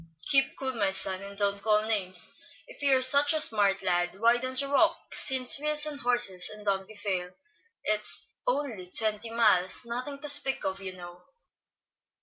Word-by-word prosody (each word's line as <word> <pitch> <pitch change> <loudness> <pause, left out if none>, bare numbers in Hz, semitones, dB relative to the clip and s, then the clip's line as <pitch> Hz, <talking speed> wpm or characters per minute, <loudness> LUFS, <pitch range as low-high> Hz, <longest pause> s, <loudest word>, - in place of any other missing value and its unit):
"Keep 270 -1 +1
cool, 265 -1 -4
my 205 -5 -1
son, 190 0 +1
and 200 0 -11
don't 200 -1 -2
call 215 0 +1
names. 190 -5 +2 0.3
If - - -14
you 275 -2 +3
are 260 - 0
such 280 +3 +5
a - - +1
smart 205 -8 +2
lad, 175 0 -2
why 235 +2 +3
don't 255 +1 -2
you 280 0 -2
walk, 280 - 0
since 260 0 +4
wheels 300 0 +2
and 295 -2 -5
horses 240 -8 +1
and 210 0 -10
donkey 195 +1 -3
fail. 185 -3 -5 0.5
It's 210 0 -3 0.2
only 250 - -3
twenty 215 +2 +1
miles, 220 -3 +1
nothing 250 +4 -6
to 295 - -9
speak 285 -2 +2
of, 190 +1 -4
you 190 -1 -7
know." 175 -1 -13
215 Hz, 175 wpm, -27 LUFS, 195-265 Hz, 0.5 s, such